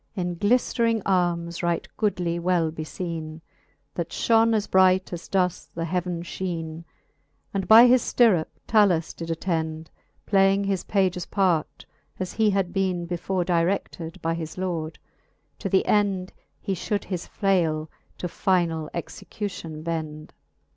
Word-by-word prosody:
In 175 -3 -2
gliflering 230 +1 +2
armes 175 -2 0
right 170 -1 -1
goodly 175 -5 0
well 170 -2 +1
befeene, 160 0 -5 0.5
That 170 -1 -3
fhone 225 +4 +3
as 210 -1 0
bright, 185 -1 +3
as 170 - -6
doth 180 -3 0
the 165 0 -2
heaven, 175 0 -2
fheene; 170 -2 -5 0.7
And 195 -2 -2
by 225 +2 +9
his 250 0 +5
ftirrup 205 -10 +3 0.2
7alus 195 -7 +3
did 165 0 -7
attend. 160 -2 -2 0.3
Playing 195 0 +3
his 195 -2 -1
pages 185 -3 0
part, 180 -6 0 0.3
as 185 -1 -3
he 220 -1 +3
had 195 -3 0
beene 185 -3 0
Before 175 +1 -2
direded 170 -1 -1
by 165 0 +1
his 160 0 -6
lord; 165 -4 -3 0.6
to 195 - -3
th'end 195 -1 +1 0.3
He 195 - -2
fhould 200 +3 -2
his 180 -3 -5
flale 165 -6 +1 0.3
to - - -5
finall 170 -4 0
execution 170 -2 -6
bend. 155 -2 -4
XXX. - - -46
180 Hz, 135 wpm, -25 LUFS, 165-195 Hz, 0.7 s, by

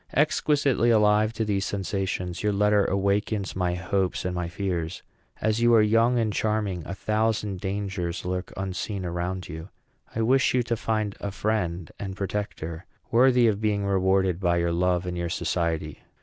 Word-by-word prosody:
Exquisitely 145 -4 +2
alive 105 -1 +4
to 115 -1 -2
these 100 -2 0
sensations, 95 -3 -2
your 105 - +1
letter 105 0 +3
awakens 100 +1 0
my 90 -1 0
hopes 95 +1 -1
and 90 - -1
my 90 -1 -2
fears. 85 -2 -3 0.4
As 110 +1 0
you 120 0 +5
are 110 - +7
young 115 +3 +3
and 110 -3 +1
charming, 105 -5 -1
a 100 - -4
thousand 110 -2 0
dangers 95 -3 -3
lurk 90 0 -3
unseen 95 0 -3
around 90 +1 -3
you. 80 +2 -8 0.5
I 115 - +1
wish 130 +3 +3
you 125 - +3
to 120 0 -1
find 110 -2 -1
a 100 - -3
friend 95 -5 -2
and 95 -2 -5
protector 95 -4 -4 0.2
worthy 125 0 +5
of 105 -1 0
being 105 -2 0
rewarded 95 -2 +2
by 85 -2 +2
your 85 0 +1
love 90 +1 +1
and 90 0 -3
your 85 -1 -2
society. 80 -3 -2
100 Hz, 165 wpm, -26 LUFS, 90-110 Hz, 0.5 s, are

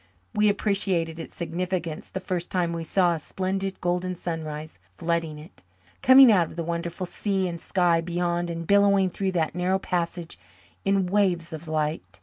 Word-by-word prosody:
We 210 -1 +4
appreciated 195 -5 0
its 165 - -8
significance 170 -1 -3
the 190 - -4
first 180 -2 -3
time 175 -2 0
we 165 -1 -3
saw 175 +1 +2
a 165 - -3
splendid 190 +4 -3
golden 180 +1 -1
sunrise 155 - -5 0.2
flooding 165 0 -1
it, 150 +2 -14 0.4
coming 260 -1 +9
out 180 -5 +4
of - - -12
the 170 - -3
wonderful 170 +2 -3
sea 190 +1 -1
and 170 -1 -5
sky 175 -3 +2
beyond 175 0 -1
and 165 0 -4
billowing 200 0 +4
through 190 0 -2
that 165 -3 0
narrow 180 +2 +1
passage 175 - -3 0.4
in 195 -1 +2
waves 180 -4 +1
of 160 +1 -7
light. 155 0 -2
175 Hz, 165 wpm, -26 LUFS, 165-190 Hz, 0.4 s, coming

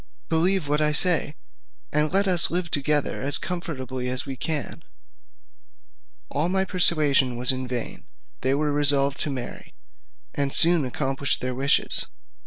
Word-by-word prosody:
Believe 170 0 +2
what 150 +1 0
I 150 0 +2
say, 160 -2 +4 0.6
and 150 +1 +1
let 195 +2 +2
us 180 -3 +2
live 175 -1 -2
together 145 0 -1
as 140 +2 0
comfortably 130 -8 -5
as 130 +1 -1
we 135 - -6
can." 150 +3 -4 1.5
All 150 +5 -1
my 190 +1 0
persuasion 150 -9 +2
was 125 +2 +2
in 130 -1 -4
vain; 125 -2 -6 0.3
they 130 +1 0
were 150 +1 -1
resolved 145 -1 +3
to - - -2
marry, 130 -3 -8 0.6
and 140 -1 -2
soon 170 -2 +4
accomplished 135 +1 -1
their 125 0 -4
wishes. 135 +3 +1
145 Hz, 145 wpm, -23 LUFS, 135-165 Hz, 1.5 s, say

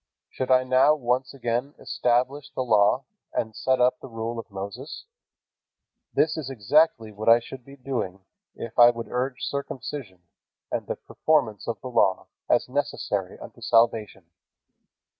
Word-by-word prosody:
Should 130 - -3
I 130 0 +5
now 130 +4 +4
once 130 -1 -1
again 125 +2 -2
establish 130 +4 0
the 130 - -3
Law, 110 +2 +3 0.3
and 110 -1 -2
set 130 -1 +1
up 125 +1 +3
the - - -9
rule 115 0 -4
of 115 - -8
Moses? 100 - -7 1.1
This 155 +1 +2
is 145 -4 -4
exactly 120 -1 +2
what 105 +2 -1
I 115 +1 +8
should 125 +2 -10
be 140 +3 -13
doing, 125 -8 -4 0.3
if 115 - -6
I 120 0 +10
would 115 -1 -4
urge 125 +1 -2
circumcision 130 -8 -5 0.5
and - - -2
the - - -2
performance 135 -11 0
of 115 - -3
the 130 - -6
Law 100 -5 +2 0.2
as - - +3
necessary 125 -8 -2
unto - - -12
salvation. 115 -5 +2
125 Hz, 150 wpm, -25 LUFS, 110-135 Hz, 1.1 s, I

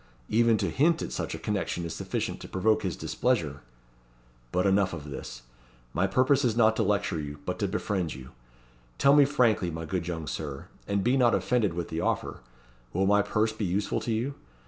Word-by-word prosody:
Even 115 0 +4
to - - -1
hint 160 +4 +2
at - - -5
such - - -3
a - - -5
connection 100 -4 -2
is 85 - -4
sufficient - - -3
to - - -9
provoke 110 +3 +2
his 90 -4 -2
displeasure! 80 - -1 0.9
But 90 +1 +1
enough 95 -1 +3
of 75 -3 -7
this. - - -7 0.5
My 95 +3 +2
purpose 130 +7 +3
is 115 -3 +1
not 110 -1 +5
to - - +2
lecture 100 -5 0
you, 75 -1 -6
but - - -3
to - - +1
befriend 90 -8 -2
you. 65 0 -11 0.7
Tell 140 - +5
me 145 -1 +7
frankly, 120 -10 +2
my 80 0 -5
good 85 +1 -3
young 80 -3 -3
Sir 70 -1 -5 0.2
and 100 -1 0
be 125 +3 +3
not 120 -3 +4
offended 110 -8 +1
with 85 -1 -3
the 80 - -2
offer - - -1 0.5
will 95 +3 +1
my 105 +1 +4
purse 110 +2 0
be 110 - -4
useful 95 +5 0
to 115 - -3
you? 120 +6 -1
100 Hz, 200 wpm, -28 LUFS, 85-115 Hz, 0.9 s, me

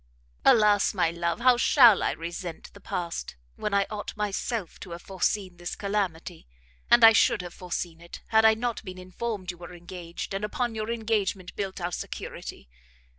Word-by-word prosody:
"Alas, 210 -2 +5
my 175 -3 +2
love, 170 +4 -2
how 250 0 +5
shall 240 -4 +6
I - - +1
resent 170 0 -7
the - - -13
past, 170 - -4 0.2
when 210 - -3
I 200 0 +3
ought 210 0 -6
myself 210 -1 -3
to 175 - -8
have 170 - -9
foreseen 190 -1 -1
this 175 0 -5
calamity! 190 - -3 0.4
and 240 -1 +6
I 225 0 +10
should 205 - +3
have 175 - -8
foreseen 175 -2 -5
it, 170 - -11
had 220 0 +5
I 220 0 +6
not 235 0 -3
been 185 -3 -8
informed 185 +1 -4
you 175 - -16
were 175 0 -10
engaged, 175 +1 -7
and 195 +1 -3
upon 235 +3 -2
your 215 0 -4
engagement 215 -5 -1
built 195 -2 -4
our 175 0 -3
security. 65 - -7
195 Hz, 175 wpm, -27 LUFS, 175-220 Hz, 0.4 s, I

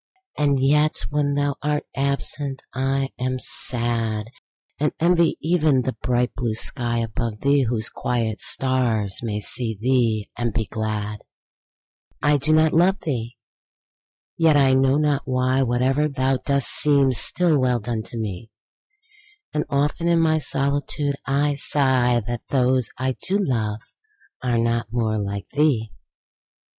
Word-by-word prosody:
And 140 -2 +1
yet 150 +3 +2
when 145 -1 0
thou 145 -1 0
art 150 0 -1
absent 140 0 -2
I 135 +1 -1
am 130 +1 -1
sad; 115 -3 +1 0.5
And 150 +1 0
envy 170 0 +3
even 155 -5 +2
the 130 - -2
bright 125 0 0
blue 120 -3 -2
sky 120 0 -1
above 115 -1 -3
thee, 140 -1 +3
Whose 110 -2 -1
quiet 115 -3 -2
stars 120 -7 0
may 105 -3 -3
see 110 +1 -3
thee 115 -3 +1
and 120 -3 -3
be 110 -2 0
glad. 105 -1 -4 1.0
I 145 0 +3
do 140 +3 0
not 155 0 +4
love 185 +4 +3
thee!—yet, 145 +4 -4
I 135 -2 +4
know 135 +1 +3
not 150 -2 0
why, 130 0 +1
5 135 - +1
Whate'er 130 +5 +1
thou 135 -2 0
dost 140 +1 0
seems 140 -5 +4
still 170 -5 +3
well 125 -2 +1
done, 115 0 -3
to 110 +3 -9
me: 110 -1 -5 1.0
And 150 - -1
often 145 +4 0
in 170 -1 +3
my 160 -1 +2
solitude 140 +1 -1
I 145 +2 +1
sigh 130 -4 +1
That 120 0 -4
those 130 -2 +1
I 130 +1 -1
do 195 +2 0
love 110 - -1 0.6
are 125 -2 0
not 115 -1 0
more 110 -3 0
like 100 -2 -4
thee! 140 -8 +1
130 Hz, 140 wpm, -22 LUFS, 115-145 Hz, 1.0 s, not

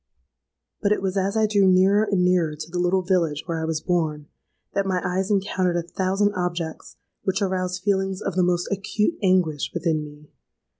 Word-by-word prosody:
"But 200 - +1
it 210 - +1
was 190 0 -1
as 195 +2 0
I 220 - +4
drew 205 -2 +3
nearer 190 +3 +4
and 185 -3 +2
nearer 175 -4 +2
to 160 +2 -8
the 175 - -2
little 180 +1 +2
village 170 -5 0
where 165 -2 -3
I - - -1
was 160 -1 -2
born, 160 -4 -1 0.5
that 200 -1 0
my 185 -1 +1
eyes 185 +1 -1
encountered 190 -3 +1
a 170 - -1
thousand 190 +4 0
objects 175 -3 -4 0.3
which 190 0 -1
aroused 185 -2 -2
feelings 195 -2 0
of 195 - -3
the 185 - +3
most 175 0 +1
acute 210 - 0
anguish 180 -7 +2
within 160 -3 0
me. 150 0 -13
185 Hz, 190 wpm, -24 LUFS, 170-195 Hz, 0.5 s, I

